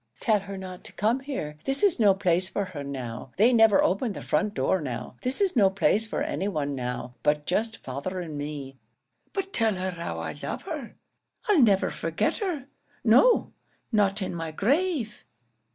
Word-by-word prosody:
"Tell 215 Hz, -2 st, +3 dB
her 200 Hz, 0 st, -7 dB
not 185 Hz, -1 st, -8 dB
to -, -, -10 dB
come 225 Hz, +5 st, +1 dB
here. 205 Hz, -, -5 dB
This 270 Hz, +7 st, -1 dB
is 395 Hz, -9 st, +4 dB
no 205 Hz, -4 st, +6 dB
place 185 Hz, -1 st, +1 dB
for 200 Hz, -, -1 dB
her 165 Hz, -6 st, -7 dB
now. 125 Hz, -3 st, -6 dB
They 230 Hz, +6 st, +5 dB
never 225 Hz, -3 st, +6 dB
open 200 Hz, +4 st, +1 dB
the -, -, -7 dB
front 210 Hz, 0 st, 0 dB
door 190 Hz, -, +1 dB
now. 125 Hz, -3 st, -5 dB
This 255 Hz, +1 st, -2 dB
is 385 Hz, -5 st, +2 dB
no 200 Hz, -5 st, +6 dB
place 195 Hz, +3 st, +2 dB
for 260 Hz, -, -2 dB
any 295 Hz, -10 st, -2 dB
one 150 Hz, -7 st, -1 dB
now, 125 Hz, -1 st, -4 dB
but 150 Hz, 0 st, +1 dB
just 220 Hz, +5 st, 0 dB
father 140 Hz, +8 st, -5 dB
and 165 Hz, -4 st, -5 dB
me. 145 Hz, -2 st, -6 dB, 0.5 s
But 390 Hz, -1 st, -4 dB
tell 225 Hz, -3 st, +2 dB
her 185 Hz, 0 st, -2 dB
how 170 Hz, -1 st, -5 dB
I -, -, -4 dB
love -, -, -4 dB
her. -, -, -6 dB, 0.5 s
I'll 405 Hz, -8 st, +5 dB
never 200 Hz, -5 st, +4 dB
forget -, -, -1 dB
her; 340 Hz, -, -3 dB, 0.4 s
no, -, -, +5 dB, 0.4 s
not 205 Hz, -2 st, +2 dB
in 185 Hz, -, -3 dB
my 165 Hz, -1 st, -4 dB
grave!" 265 Hz, -, 0 dB
195 Hz, 185 wpm, -27 LUFS, 155-235 Hz, 0.5 s, no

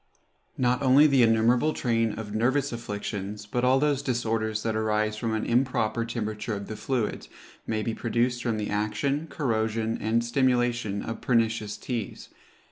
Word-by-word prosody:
Not 125 Hz, 0 st, +1 dB
only 135 Hz, +2 st, +6 dB
the 140 Hz, -4 st, +4 dB
innumerable 120 Hz, +6 st, +3 dB
train 115 Hz, -3 st, 0 dB
of 105 Hz, -2 st, -6 dB
nervous 130 Hz, +6 st, +1 dB
afflictions, 105 Hz, -2 st, -5 dB
but 120 Hz, +4 st, -2 dB
all 130 Hz, +1 st, +4 dB
those 145 Hz, 0 st, +1 dB
disorders 115 Hz, -4 st, -1 dB
that 110 Hz, -1 st, -1 dB
arise 110 Hz, 0 st, 0 dB
from 110 Hz, +1 st, -2 dB
an 110 Hz, -, -2 dB
improper 115 Hz, -2 st, +1 dB
temperature 110 Hz, -1 st, -3 dB
of 100 Hz, 0 st, -6 dB
the 110 Hz, -, -6 dB
fluids, 110 Hz, 0 st, -2 dB, 0.4 s
may 110 Hz, -1 st, -1 dB
be 115 Hz, -, -2 dB
produced 120 Hz, +2 st, 0 dB
from 115 Hz, -3 st, -1 dB
the 105 Hz, -1 st, -3 dB
action, 135 Hz, +9 st, -1 dB
corrosion, 115 Hz, -4 st, -1 dB
and 115 Hz, +2 st, +1 dB
stimulation 120 Hz, -4 st, +1 dB
of 115 Hz, -, -5 dB
pernicious 115 Hz, -3 st, +1 dB
teas. 115 Hz, -4 st, -5 dB
115 Hz, 155 wpm, -27 LUFS, 110-125 Hz, 0.4 s, only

